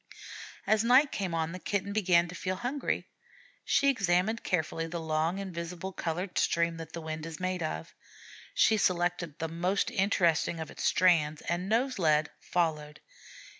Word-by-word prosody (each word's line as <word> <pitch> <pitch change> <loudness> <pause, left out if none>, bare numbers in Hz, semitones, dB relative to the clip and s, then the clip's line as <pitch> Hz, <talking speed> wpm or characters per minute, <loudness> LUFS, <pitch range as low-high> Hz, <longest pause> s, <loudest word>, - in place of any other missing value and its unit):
As 215 0 +3
night 255 +4 +5
came 185 -4 -2
on 165 0 -1
the 185 - -6
Kitten 200 +1 -2
began 180 -5 +3
to 175 - -9
feel 185 0 -3
hungry. 250 +8 -2 0.6
She 280 - +2
examined 200 -2 +1
carefully 165 -2 -1
the 170 +1 -4
long 160 +2 0
invisible 180 -1 -5
colored 175 +3 -2
stream 170 0 +1
that 165 -1 -9
the 170 - -5
wind 155 0 -5
is 160 -2 -8
made 185 -1 -2
of. 80 - -4 0.6
She 220 - +4
selected 175 -4 0
the 165 - -2
most 175 +5 0
interesting 170 -4 +2
of 160 - -6
its - - -5
strands, 160 -4 +3
and, 175 +3 -2
nose 245 +2 +1
led, 155 -2 +2
followed. 155 -4 -1
175 Hz, 160 wpm, -30 LUFS, 165-195 Hz, 0.6 s, night